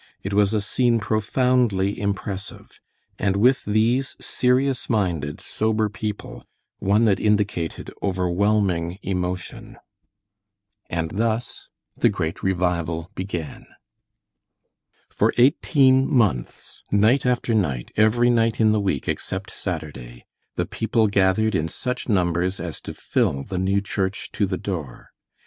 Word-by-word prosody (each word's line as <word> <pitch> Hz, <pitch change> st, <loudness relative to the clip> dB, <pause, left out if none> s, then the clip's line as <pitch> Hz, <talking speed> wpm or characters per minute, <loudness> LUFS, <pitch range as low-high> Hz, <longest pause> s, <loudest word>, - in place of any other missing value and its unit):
It 95 Hz, -, -3 dB
was 100 Hz, 0 st, +3 dB
a 110 Hz, -1 st, +1 dB
scene 120 Hz, +2 st, +1 dB
profoundly 110 Hz, -2 st, +1 dB
impressive, 100 Hz, 0 st, -5 dB, 0.4 s
and 100 Hz, -1 st, +1 dB
with 125 Hz, +6 st, +3 dB
these 115 Hz, +6 st, +1 dB
serious 130 Hz, +1 st, 0 dB
minded, 85 Hz, -10 st, -1 dB
sober 110 Hz, 0 st, 0 dB
people, 105 Hz, 0 st, -6 dB, 0.4 s
one 105 Hz, +4 st, +3 dB
that 100 Hz, -3 st, +3 dB
indicated 105 Hz, -6 st, 0 dB
overwhelming 95 Hz, -1 st, 0 dB
emotion. 90 Hz, -1 st, -4 dB, 1.1 s
And 80 Hz, -1 st, -2 dB
thus 115 Hz, +3 st, -2 dB, 0.3 s
the -, -, +3 dB
great 80 Hz, +2 st, -3 dB
revival 85 Hz, -2 st, -1 dB
began. 90 Hz, -5 st, -5 dB, 1.4 s
For -, -, +1 dB
eighteen 135 Hz, 0 st, +4 dB
months, 105 Hz, -, -1 dB
night 110 Hz, +7 st, +4 dB
after 125 Hz, -2 st, 0 dB
night, 75 Hz, -, -1 dB
every 120 Hz, +3 st, +4 dB
night 115 Hz, -1 st, +2 dB
in 110 Hz, -1 st, +5 dB
the 105 Hz, -1 st, +2 dB
week 95 Hz, -9 st, -1 dB
except 95 Hz, +1 st, -3 dB
Saturday, 75 Hz, -9 st, -6 dB, 0.3 s
the -, -, 0 dB
people 115 Hz, 0 st, 0 dB
gathered 100 Hz, +2 st, +2 dB
in 80 Hz, -3 st, 0 dB
such 125 Hz, +10 st, -4 dB
numbers 90 Hz, -1 st, +1 dB
as 85 Hz, -4 st, -6 dB
to -, -, -8 dB
fill 70 Hz, 0 st, 0 dB
the 95 Hz, +2 st, -4 dB
new 95 Hz, +2 st, +1 dB
church 100 Hz, -1 st, -3 dB
to 100 Hz, -, 0 dB
the 95 Hz, -1 st, -2 dB
door. 80 Hz, -11 st, -6 dB
100 Hz, 125 wpm, -23 LUFS, 90-110 Hz, 1.4 s, in